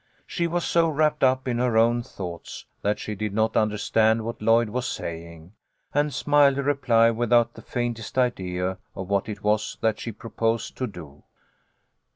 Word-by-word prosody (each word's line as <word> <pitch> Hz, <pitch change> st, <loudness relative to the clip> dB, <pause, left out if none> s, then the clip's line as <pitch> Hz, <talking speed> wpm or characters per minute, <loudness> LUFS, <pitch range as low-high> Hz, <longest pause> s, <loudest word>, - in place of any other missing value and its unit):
She 170 Hz, -2 st, -1 dB
was 175 Hz, +1 st, -1 dB
so 165 Hz, -1 st, +3 dB
wrapped 150 Hz, 0 st, +1 dB
up 130 Hz, 0 st, +3 dB
in 120 Hz, -1 st, 0 dB
her 125 Hz, -2 st, +1 dB
own 120 Hz, +1 st, +4 dB
thoughts 90 Hz, -7 st, -8 dB, 0.2 s
that 105 Hz, +1 st, 0 dB
she 105 Hz, -, -5 dB
did 105 Hz, 0 st, -4 dB
not 110 Hz, +1 st, +1 dB
understand 110 Hz, +1 st, +2 dB
what 115 Hz, -1 st, -5 dB
Lloyd 115 Hz, +1 st, +3 dB
was 125 Hz, +3 st, -2 dB
saying, 85 Hz, +1 st, -7 dB, 0.4 s
and 145 Hz, +1 st, +1 dB
smiled 140 Hz, 0 st, +3 dB
a 140 Hz, -, -1 dB
reply 120 Hz, -5 st, +3 dB
without 120 Hz, 0 st, +2 dB
the -, -, -12 dB
faintest 120 Hz, -1 st, -4 dB
idea 95 Hz, -7 st, -1 dB, 0.2 s
of 95 Hz, 0 st, -6 dB
what 100 Hz, +1 st, 0 dB
it 105 Hz, -1 st, -7 dB
was 105 Hz, 0 st, 0 dB
that 110 Hz, -1 st, +1 dB
she 115 Hz, -, -5 dB
proposed 115 Hz, 0 st, -2 dB
to 130 Hz, -, -1 dB
do. 80 Hz, -8 st, -11 dB
115 Hz, 175 wpm, -25 LUFS, 105-125 Hz, 0.4 s, own